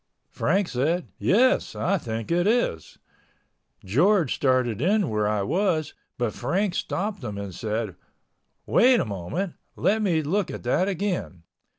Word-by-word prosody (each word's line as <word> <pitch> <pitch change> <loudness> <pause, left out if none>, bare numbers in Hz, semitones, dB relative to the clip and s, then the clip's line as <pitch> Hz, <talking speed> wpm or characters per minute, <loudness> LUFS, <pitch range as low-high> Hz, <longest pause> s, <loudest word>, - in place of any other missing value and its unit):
Frank 190 +3 +1
said, 160 +8 -1
"Yes, 250 +7 +3
I 195 +1 0
think 115 -3 -5
it 175 +2 +2
is." 215 - 0 0.9
George 170 - +3
started 130 -5 +1
in 195 - +2
where 105 -1 +1
I 105 -1 0
was, 170 - 0 0.2
but 120 -3 -1
Frank 180 +9 -1
stopped 200 -2 -3
him 105 -4 -5
and 100 -2 -6
said, 110 0 -3 0.7
"Wait 250 0 +5
a - - 0
minute, 105 - -3 0.2
let 220 +2 +1
me 170 -7 +1
look 190 +6 0
at - - -7
that 150 +10 +1
again." 180 - -3
160 Hz, 145 wpm, -25 LUFS, -, 0.9 s, Wait